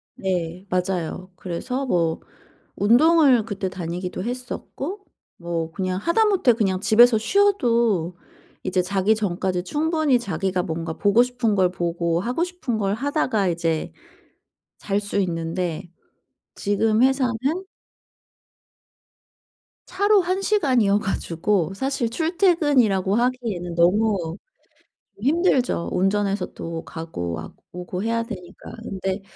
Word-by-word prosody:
네. 180 Hz, -1 st, -3 dB
맞아요. 180 Hz, 0 st, -2 dB
그래서 195 Hz, +10 st, -4 dB
뭐 170 Hz, -8 st, +1 dB, 0.6 s
운동을 255 Hz, -, +5 dB
그때 205 Hz, -3 st, -3 dB
다니기도 180 Hz, +1 st, -5 dB
했었고 255 Hz, -, -5 dB, 0.3 s
뭐 170 Hz, -2 st, -3 dB
그냥 185 Hz, 0 st, -2 dB
하다못해 370 Hz, -, +3 dB
그냥 195 Hz, -5 st, 0 dB
집에서 230 Hz, +2 st, +6 dB
쉬어도 230 Hz, -, +2 dB, 0.5 s
이제 185 Hz, 0 st, 0 dB
자기 195 Hz, +3 st, +1 dB
전까지 185 Hz, -3 st, -2 dB
충분히 310 Hz, -, +1 dB
자기가 190 Hz, -3 st, -2 dB
뭔가 165 Hz, -1 st, -4 dB
보고 205 Hz, +3 st, +4 dB
싶은 245 Hz, -3 st, 0 dB
걸 185 Hz, -2 st, +3 dB
보고 170 Hz, -1 st, -1 dB
하고 245 Hz, -, -1 dB
싶은 355 Hz, -11 st, -4 dB
걸 200 Hz, -1 st, 0 dB
하다가 255 Hz, -, 0 dB
이제 165 Hz, -2 st, -1 dB, 0.9 s
잘 200 Hz, 0 st, -1 dB
수 205 Hz, 0 st, -3 dB
있는데. 170 Hz, -1 st, -2 dB, 0.7 s
지금 215 Hz, +3 st, +1 dB
회사는 260 Hz, -1 st, +3 dB, 2.6 s
차로 405 Hz, +2 st, +3 dB
1 370 Hz, +2 st, -1 dB
시간이어 255 Hz, -, +2 dB
가지고 190 Hz, -2 st, -1 dB
사실 265 Hz, +2 st, -1 dB
출퇴근이라고 290 Hz, -, +2 dB
하기에는 230 Hz, -8 st, -1 dB
너무 180 Hz, -1 st, +2 dB, 0.8 s
힘들죠. 270 Hz, -, +1 dB
운전해서 195 Hz, +1 st, 0 dB
또 165 Hz, -1 st, -6 dB
가고 85 Hz, -, -5 dB
아고 80 Hz, -, -9 dB, 0.2 s
오고 180 Hz, +1 st, -5 dB
해야 230 Hz, +1 st, 0 dB
되니까. 190 Hz, -7 st, -9 dB
근데 190 Hz, -2 st, -3 dB
200 Hz, 245 characters per minute, -23 LUFS, 180-250 Hz, 2.6 s, 집에서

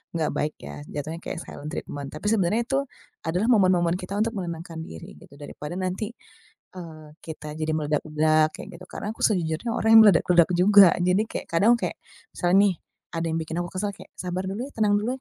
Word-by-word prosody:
nggak 160 Hz, -2 st, 0 dB
baik 150 Hz, +1 st, -1 dB
ya, 70 Hz, 0 st, -9 dB
jatuhnya 155 Hz, +3 st, -5 dB
kayak -, -, -5 dB
silent 150 Hz, -2 st, -8 dB
treatment 145 Hz, -4 st, -6 dB
tapi 155 Hz, +7 st, -6 dB
sebenarnya 210 Hz, 0 st, +2 dB
itu 270 Hz, +1 st, +1 dB, 0.4 s
adalah 180 Hz, +7 st, 0 dB
momen-momen 185 Hz, -7 st, +3 dB
kita 185 Hz, +2 st, -4 dB
untuk 225 Hz, +1 st, 0 dB
menenangkan 170 Hz, -3 st, -5 dB
diri 80 Hz, -, -10 dB
gitu 75 Hz, -, -17 dB
daripada 150 Hz, +4 st, -7 dB
nanti, 185 Hz, +4 st, -3 dB, 0.6 s
eee, 165 Hz, -4 st, -10 dB, 0.2 s
kita 155 Hz, -2 st, -8 dB
jadi 155 Hz, 0 st, -3 dB
meledak-ledak 155 Hz, +1 st, +2 dB
kayak -, -, -9 dB
gitu. -, -, -10 dB
Karena 210 Hz, -, -5 dB
aku -, -, -14 dB
sejujurnya 175 Hz, 0 st, 0 dB
orang 220 Hz, -, +1 dB
yang 225 Hz, -, +11 dB
meledak-ledak 175 Hz, -3 st, +4 dB
juga 195 Hz, +1 st, +7 dB
jadi 180 Hz, +3 st, +2 dB
kek -, -, -5 dB
kadang 220 Hz, +8 st, +5 dB
kek -, -, -3 dB, 0.4 s
misalnya 175 Hz, +1 st, +2 dB
nih 195 Hz, -, +2 dB, 0.4 s
ada 165 Hz, 0 st, -2 dB
yang 160 Hz, -, -1 dB
bikin 160 Hz, 0 st, -5 dB
aku 175 Hz, -, -5 dB
kesal 200 Hz, +1 st, -2 dB
kayak, -, -, -14 dB
"Sabar 180 Hz, 0 st, -3 dB
dulu 215 Hz, +6 st, -4 dB
ya 285 Hz, -, -11 dB
tenang 210 Hz, -2 st, +2 dB
dulu 210 Hz, +3 st, -2 dB
175 Hz, 195 wpm, -25 LUFS, 155-205 Hz, 0.6 s, yang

